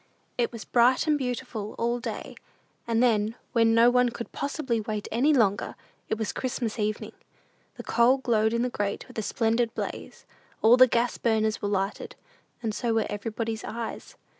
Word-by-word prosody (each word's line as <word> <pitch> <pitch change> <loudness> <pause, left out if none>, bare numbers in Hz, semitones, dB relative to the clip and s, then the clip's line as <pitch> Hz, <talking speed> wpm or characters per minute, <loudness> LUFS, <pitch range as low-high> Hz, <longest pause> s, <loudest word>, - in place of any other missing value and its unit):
It 240 -1 0
was 230 -2 -8
bright 250 +1 +3
and 305 -1 +3
beautiful 245 -5 -4
all 235 +1 0
day, 230 -3 -6 0.5
and 230 +1 +2
then, 220 -2 +2 0.2
when 230 -1 +3
no 235 +1 +6
one 250 0 +3
could 235 0 -7
possibly 275 -5 -2
wait 215 -1 -4
any 255 +7 +3
longer, 210 -8 +2 0.3
it 220 - 0
was 220 -1 -3
Christmas 245 -3 -3
evening. 210 0 -2 0.6
The - - -8
coal 240 +3 +4
glowed 220 -4 +1
in 235 +1 0
the 250 - 0
grate 205 -2 -3
with - - -6
a - - 0
splendid 230 +2 0
blaze: - - -6 0.4
all 225 +2 +8
the 255 0 +7
gas 240 0 0
burners 220 -1 +1
were 205 - -1
lighted, 195 0 -2 0.5
and 220 -2 -1
so 230 +1 -1
were 225 - +2
everybody's 220 +2 -3
eyes. 230 0 -6
230 Hz, 175 wpm, -27 LUFS, 220-245 Hz, 0.6 s, all